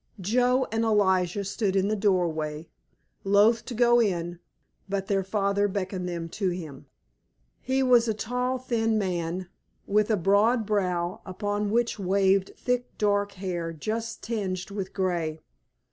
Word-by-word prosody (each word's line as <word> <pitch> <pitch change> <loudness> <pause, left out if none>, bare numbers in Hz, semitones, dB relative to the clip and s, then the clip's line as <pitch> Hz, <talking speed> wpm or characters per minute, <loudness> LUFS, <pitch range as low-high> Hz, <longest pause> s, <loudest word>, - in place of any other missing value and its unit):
Joe 250 +6 +2
and 225 +1 0
Elijah 195 -3 +2
stood 195 0 -1
in 195 0 +2
the 215 - +1
doorway, 165 -6 0 0.6
loath 205 +4 +4
to 245 - -6
go 240 +1 +5
in, 175 -5 -1 0.5
but 195 -1 -1
their 195 -1 0
father 200 +1 +1
beckoned 185 -2 -3
them 170 -1 -4
to 195 +1 -1
him. 160 -6 -7 0.7
He 265 +1 +1
was 245 -2 +5
a 220 - +1
tall, 250 +4 -1
thin 225 -3 0
man, 180 -2 -2 0.4
with 210 +1 +2
a 215 - +3
broad 210 +6 +3
brow 180 -4 -1
upon 205 +2 -2
which 235 0 0
waved 195 0 +2
thick 250 0 -2
dark 205 -1 +1
hair 180 -3 -4
just 225 +8 -4
tinged 195 -5 -3
with 195 -2 -4
grey. 170 -5 -1
200 Hz, 145 wpm, -27 LUFS, 185-225 Hz, 0.7 s, go